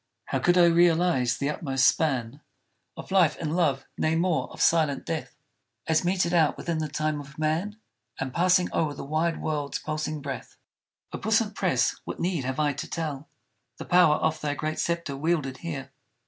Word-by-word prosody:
How - - -1
could 175 +1 +3
I 175 - +7
realize 170 -6 +3
the 140 +1 -1
utmost 135 -4 +1
span 135 -3 0 0.6
Of - - -9
life 175 -6 +4
and 160 0 -2
love, 140 -7 +1
nay 155 +1 +1
more, 170 0 0
of - - -12
silent 155 -5 +2
death 160 -2 -4 0.5
As 160 +1 +2
meted 180 -1 +1
out 160 -4 +3
within 170 -2 -2
the 155 - -1
time 150 0 -2
of 145 +1 -14
man, 160 +7 -1 0.4
And 130 -1 -3
passing 180 +1 +3
o'er 150 -3 0
the - - -7
wide 160 +3 0
world's 145 -2 -2
pulsing 155 0 -3
breath? 140 -1 -7 0.6
O - - -4
puissant - - +1
Press! - - +1
what - - -6
need 170 -6 -1
have 130 +2 -3
I 150 -1 +2
to 140 - -6
tell 155 -2 -4 0.5
The - - -7
power 175 -4 +5
of 160 0 -1
thy 145 -1 -1
great 155 +2 -3
sceptre 170 -4 -2
wielded 145 -3 -1
here? 140 -6 -6
155 Hz, 180 wpm, -26 LUFS, 145-170 Hz, 0.6 s, I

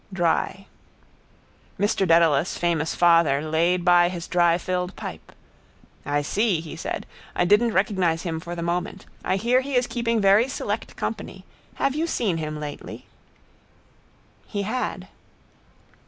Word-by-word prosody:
Dry. 185 +2 0 1.1
Mr 200 -2 +1
Dedalus, 165 -1 +3
famous 165 -2 0
father, 165 -5 +4
laid 165 +4 +1
by 175 -1 +5
his 175 -2 -6
dry 175 -1 +3
filled 180 +1 -3
pipe. - - -8 0.8
—I 145 0 0
see, 205 +2 +1
he 160 -1 -8
said. - - -4 0.3
I 175 - +2
didn't 210 +5 +4
recognise 185 -4 +1
him 165 -2 -3
for 170 +2 -7
the 170 - -4
moment. 180 +3 -3 0.2
I - - +1
hear 240 +6 +2
he 275 0 -4
is 250 0 +3
keeping 235 -2 -1
very 200 +4 +5
select 220 -5 -4
company. 195 -3 -5 0.3
Have 275 - 0
you 315 +3 -1
seen 210 - 0
him 155 -1 -4
lately? 150 -1 -7 1.4
He 200 -2 -3
had. 250 +5 -3
180 Hz, 140 wpm, -24 LUFS, 165-205 Hz, 1.4 s, by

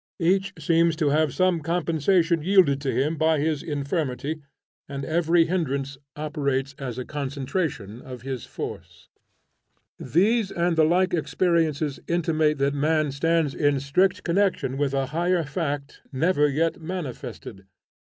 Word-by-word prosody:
Each 190 +3 +2
seems 165 -1 +2
to 155 -2 +1
have 155 0 +2
some 185 +1 +2
compensation 165 +1 +1
yielded 170 -6 +4
to 140 - -1
him 150 +5 0
by 160 +1 +3
his 150 0 0
infirmity, 145 0 -3 0.5
and 140 -1 -5
every 165 +2 +3
hindrance 140 -6 -2 0.2
operates 140 -3 -2
as 125 -4 -5
a 125 - -4
concentration 140 - -3
of 125 -2 -9
his 130 -2 -4
force. - - -8 0.9
These 205 - +2
and 170 0 0
the 160 -1 +5
like 180 +3 +2
experiences 160 -4 0
intimate 155 -3 +1
that 140 +1 +1
man 155 +1 +1
stands 160 +1 +1
in 145 -2 +1
strict 145 +8 +1
connection 180 -7 +1
with 140 -1 0
a 135 0 +1
higher 175 +1 +1
fact 145 -2 -4
never 150 +1 +2
yet 160 +4 0
manifested. 130 - -7
155 Hz, 135 wpm, -25 LUFS, 140-170 Hz, 0.9 s, the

